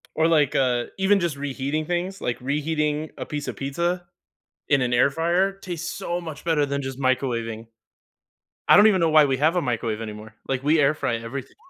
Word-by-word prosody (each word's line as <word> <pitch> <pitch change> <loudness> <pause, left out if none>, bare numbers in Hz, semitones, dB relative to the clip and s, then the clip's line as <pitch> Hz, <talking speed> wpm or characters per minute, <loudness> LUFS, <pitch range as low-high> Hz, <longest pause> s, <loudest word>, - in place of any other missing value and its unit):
Or, 160 +1 +3
like, 150 -3 +3
uh, 125 -3 +2
even 195 +1 +3
just 170 -5 -1
reheating 140 +2 -3
things, 180 +3 -3
like, 120 - -2
reheating 150 +2 -1
a - - -5
piece 150 -1 -4
of - - -6
pizza 170 +6 -2 0.6
in 140 -2 +3
an 125 -1 0
air 120 +3 +4
fryer, 170 +6 +1
tastes 175 -3 -5
so 175 +1 -3
much 160 -4 -8
better 160 -3 +2
than 140 0 -2
just 135 -1 -6
microwaving. 115 -4 -1 1.0
I - - +8
don't 205 - +8
even 190 -4 +2
know 165 - +3
why 155 -1 +6
we 135 -2 0
have 160 +5 +2
a 175 - +2
microwave 115 -3 -2
anymore, 110 0 -8
like, 135 -1 -2
we 150 +3 +3
air 145 +1 +4
fry 125 -6 -2
everything. 115 +3 -7
145 Hz, 200 wpm, -24 LUFS, 130-165 Hz, 1.0 s, I